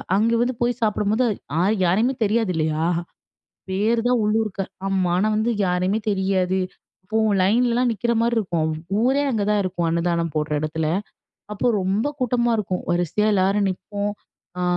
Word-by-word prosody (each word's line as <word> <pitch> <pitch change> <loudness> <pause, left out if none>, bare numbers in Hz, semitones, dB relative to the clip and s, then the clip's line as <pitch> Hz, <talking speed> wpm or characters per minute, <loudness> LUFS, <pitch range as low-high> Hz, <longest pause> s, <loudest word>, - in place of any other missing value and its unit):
அங்க 225 +3 +2
வந்து 245 +2 +1
போய் 240 +1 0
சாப்பிடும்போது, 215 +2 +1 0.4
ஆள் 205 +4 +2
யாரையுமே 215 +9 +2
தெரியாது 215 -1 +1
இல்லையா? 155 0 0 0.8
பேர் 210 +5 +1
தான் 245 -1 +2
உள்ளூர்கார். 210 -2 -1 0.2
ஆமா. 190 -2 +1
ஆனா 200 +4 +2
வந்து 220 +2 +1 0.2
யாரையுமே 185 +3 +1
தெரியாது. 190 -1 +1 0.4
அப்போ 215 +4 -2 0.2
லைன்லல்லாம் 240 +5 +2
நிக்கிற 230 +2 -1
மாரி 235 +1 +1
இருக்கும். 170 -7 0 0.3
ஊரே 265 +4 +2
அங்கதான் 210 -2 +1
இருக்கும் 175 -2 -1
அன்னதானம் 170 0 0
போடுற 150 0 -1
இடத்துல. 155 +1 -2 0.7
அப்போ 210 - -2 0.2
ரொம்ப 195 +6 0
கூட்டமா 240 -1 +1
இருக்கும். 190 -3 -2
வரிசையா 175 +4 +1
எல்லாரும் 195 +1 +2
நிப்போம். 200 +3 -4 0.5
அ - - -1
200 Hz, 140 wpm, -22 LUFS, 180-225 Hz, 0.8 s, அங்க